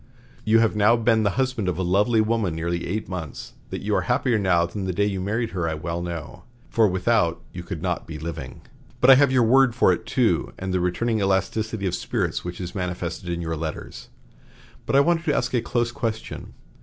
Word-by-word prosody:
You 110 +1 +4
have 115 -1 +3
now 105 +3 +5
been 115 -1 +2
the 105 - +2
husband 130 -7 0
of 85 - -2
a 95 - -1
lovely 105 +6 +3
woman 110 -6 0
nearly 85 +1 -2
eight 105 +5 -3
months. 90 -6 -6 0.2
That - - -5
you - - -1
are - - +2
happier 120 -4 +1
now 90 -4 +3
than 95 +3 -5
the 95 - -2
day 100 +3 +1
you 95 -2 -2
married 110 +4 -1
her 85 -3 -1
I 80 - -2
well 85 +2 -4
know, 85 -7 -6 0.3
for 115 -2 +4
without 95 -3 +1
you 90 - -6
could 85 -2 -6
not - - -2
be 80 -2 -6
living. 75 -5 -7 0.4
But 125 - +7
I - - +10
have 140 -2 +4
your 130 -2 +4
word 130 +1 +4
for 105 -6 +4
it - - -6
too, - - +1
and 95 0 -4
the 90 - +2
returning 110 +6 0
elasticity 100 +2 0
of 90 - -1
spirits - - -2
which 90 0 -6
is 90 -2 -5
manifested 90 -1 -4
in 85 0 -2
your 80 0 -2
letters. 80 0 -6 0.8
But - - +1
I 140 - +7
want 170 +2 +2
to 150 -3 +1
ask 125 - -1
a 120 - +2
close 120 0 -1
question. 110 -2 -5
95 Hz, 220 wpm, -24 LUFS, 85-115 Hz, 0.8 s, I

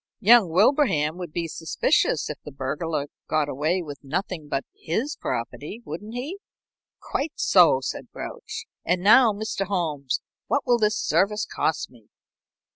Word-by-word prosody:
"Young 225 -3 +6
Wilbraham 180 - +3
would 175 -3 -6
be 170 +1 -2
suspicious 160 0 +1
if - - -6
the 150 - -8
burglar 145 +3 -2 0.2
got 155 -2 +1
away 155 +6 0
with 145 -3 -9
nothing 160 +2 -3
but 135 -1 -1
his 235 - -2
property, 145 - -5
wouldn't 210 +9 -7
he?" 295 +11 -5 0.6
"Quite 290 +3 -3
so," 170 -8 +5
said 130 - -5
Grouch. - - -7 0.2
"And 180 +1 0
now, 225 +3 +7
Mr. 205 -2 -3
Holmes, 155 -9 -1 0.3
what 285 - 0
will 240 -2 +3
this 215 0 +2
service 210 +3 +1
cost 160 - -1
me?" 115 -4 -20
175 Hz, 145 wpm, -25 LUFS, 150-215 Hz, 0.6 s, now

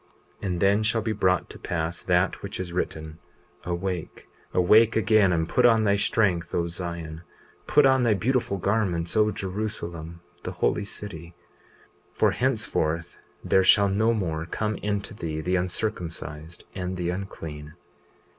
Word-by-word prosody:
20:36 - - -3
And 90 -2 -1
then 100 +2 +4
shall 110 +1 +1
be 110 - -1
brought 95 -4 +1
to - - -11
pass 85 0 -3
that 90 +1 +1
which 100 -2 -6
is 90 -2 -5
written: 80 -2 -4 0.5
Awake, 90 0 -4 0.2
awake 105 +5 +5
again, 110 -3 +4
and 80 -2 +1
put 125 - +2
on 115 -2 +5
thy 100 -1 +3
strength, 95 -4 +1
O 85 - +1
Zion; 85 -2 -5 0.5
put 150 -1 +5
on 130 -1 +5
thy 115 -3 +3
beautiful 120 -1 0
garments, 95 -4 0
O 110 0 +4
Jerusalem, 90 -5 -5 0.2
the - - -5
holy 105 - 0
city, 85 -5 -8 0.8
for - - +3
henceforth 85 -10 -1 0.2
there 95 - +3
shall 100 +2 +6
no 110 +4 +2
more 85 -7 -2
come 110 +4 -2
into 105 +2 -3
thee 80 -6 -4
the 90 +4 0
uncircumcised 85 -4 -4
and 90 -1 -4
the 90 -1 -1
unclean. 80 -5 -7
95 Hz, 150 wpm, -26 LUFS, 85-105 Hz, 0.8 s, shall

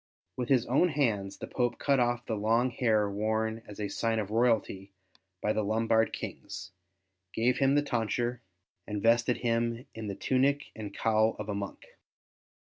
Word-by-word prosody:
With 125 -1 -3
his 125 -3 +4
own 145 +9 +3
hands 110 -10 0
the - - -6
Pope 120 -1 -1
cut 140 -2 +2
off 120 0 +1
the 115 - -2
long 115 +4 +2
hair 110 -4 +2
worn 110 +2 -1
as 105 - -10
a 105 - -1
sign 115 +3 -1
of 105 -2 -2
royalty 110 -4 +1 0.5
by 105 - +2
the 110 - 0
Lombard 110 +2 +2
Kings, 95 - -7 0.6
gave 125 +3 +2
him 135 0 +4
the 145 - +3
tonsure, 120 -1 -1 0.5
and 105 -1 -3
vested 120 +1 +3
him 115 +1 -1
in 110 -1 -6
the 100 - -4
tunic 140 +5 +1
and 105 -2 -6
cowl 110 +1 +2
of 105 0 -6
a - - -1
monk. 100 0 -5
115 Hz, 170 wpm, -30 LUFS, 105-125 Hz, 0.6 s, his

